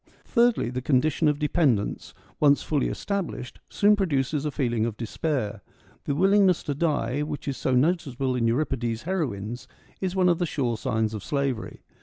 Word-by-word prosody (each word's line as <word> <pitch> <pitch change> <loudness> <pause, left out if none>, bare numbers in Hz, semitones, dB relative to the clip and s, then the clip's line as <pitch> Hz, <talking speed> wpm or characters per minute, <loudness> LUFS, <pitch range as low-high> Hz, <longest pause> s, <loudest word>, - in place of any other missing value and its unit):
Thirdly, 235 - +2
the 125 0 -3
condition 150 +4 +2
of 150 -1 +2
dependence, 145 - 0 0.2
once 145 -1 +4
fully 150 -3 0
established, 195 -10 -4
soon 210 +1 +4
produces 150 -6 0
a - - +1
feeling 120 -6 0
of 115 -2 -2
despair. 115 -3 -2 0.4
The 140 - -1
willingness 190 +1 +4
to 145 - -2
die, 145 -4 0
which 150 -1 -5
is 140 - -1
so 130 0 0
noticeable 135 -3 +1
in 120 -2 +1
Euripides' 120 -2 -1
heroines, 125 - -3 0.3
is 190 -1 -2
one 185 -1 +3
of 175 -2 +3
the 175 - 0
sure 125 -7 -1
signs 110 0 -1
of 105 -2 -5
slavery. 140 -5 -2
140 Hz, 165 wpm, -26 LUFS, 120-165 Hz, 0.4 s, once